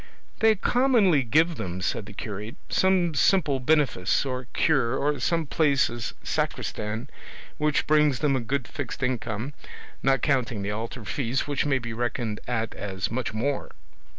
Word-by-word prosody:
"They 220 Hz, -1 st, +5 dB
commonly 220 Hz, -, +3 dB
give 155 Hz, +7 st, +2 dB
them," 90 Hz, 0 st, -4 dB
said 100 Hz, +3 st, -2 dB
the 105 Hz, -, -10 dB
curate, 105 Hz, +2 st, -6 dB
some 185 Hz, -3 st, +3 dB
simple 145 Hz, -3 st, +3 dB
benefice 140 Hz, -8 st, +2 dB
or 130 Hz, -2 st, -4 dB
cure, 135 Hz, -6 st, +2 dB
or 145 Hz, -1 st, 0 dB
some 165 Hz, +6 st, +1 dB
place 140 Hz, -3 st, +2 dB
as 120 Hz, -2 st, -5 dB
sacristan 110 Hz, +4 st, -2 dB, 0.5 s
which 150 Hz, -1 st, +1 dB
brings 150 Hz, -3 st, +4 dB
them 140 Hz, +1 st, +1 dB
a -, -, +1 dB
good 130 Hz, +2 st, -2 dB
fixed 140 Hz, -1 st, -5 dB
income, 125 Hz, 0 st, -2 dB, 0.5 s
not 135 Hz, 0 st, +2 dB
counting 120 Hz, -7 st, +1 dB
the 100 Hz, -, -2 dB
altar 115 Hz, +2 st, -5 dB
fees, 130 Hz, +1 st, -1 dB
which 145 Hz, 0 st, -1 dB
may 135 Hz, -2 st, +3 dB
be 120 Hz, -2 st, -5 dB
reckoned 120 Hz, -2 st, -2 dB
at 115 Hz, -2 st, -1 dB
as 95 Hz, -2 st, -4 dB
much 125 Hz, +1 st, -2 dB
more." 130 Hz, +6 st, -2 dB
130 Hz, 155 wpm, -26 LUFS, 115-150 Hz, 0.5 s, They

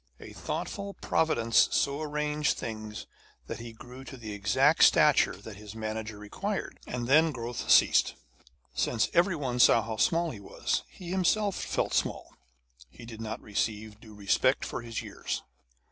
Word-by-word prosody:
A -, -, -11 dB
thoughtful 200 Hz, -1 st, -5 dB
Providence 115 Hz, -8 st, +2 dB
so 140 Hz, +2 st, +1 dB
arranged 150 Hz, 0 st, -1 dB
things 110 Hz, -1 st, -6 dB, 0.4 s
that -, -, -6 dB
he 115 Hz, 0 st, -8 dB
grew 125 Hz, +3 st, -12 dB
to 135 Hz, -, -9 dB
the 110 Hz, -3 st, -7 dB
exact 100 Hz, -1 st, +3 dB
stature -, -, +5 dB
that 105 Hz, -3 st, -11 dB
his 105 Hz, 0 st, -10 dB
manager 110 Hz, -1 st, -4 dB
required, 195 Hz, -, -4 dB
and 120 Hz, -1 st, -3 dB
then 155 Hz, +4 st, +5 dB
growth 120 Hz, -2 st, -5 dB
ceased. -, -, +5 dB, 0.6 s
Since 110 Hz, -, 0 dB
every 175 Hz, +1 st, +3 dB
one 130 Hz, -5 st, -3 dB
saw 115 Hz, -2 st, +6 dB
how 110 Hz, 0 st, -5 dB
small 170 Hz, +4 st, +2 dB
he 110 Hz, -, -9 dB
was, 100 Hz, -, -2 dB
and -, -, -21 dB
he 170 Hz, -, -5 dB
himself 190 Hz, +2 st, +1 dB
felt -, -, -2 dB
small, -, -, -1 dB, 0.6 s
he 120 Hz, -, -13 dB
did 115 Hz, -1 st, -9 dB
not 110 Hz, 0 st, -5 dB
receive 105 Hz, 0 st, -3 dB
due 110 Hz, -2 st, -14 dB
respect 100 Hz, -1 st, +1 dB
for -, -, -5 dB
his 115 Hz, -1 st, -5 dB
years. -, -, -5 dB
115 Hz, 160 wpm, -29 LUFS, 110-150 Hz, 0.6 s, saw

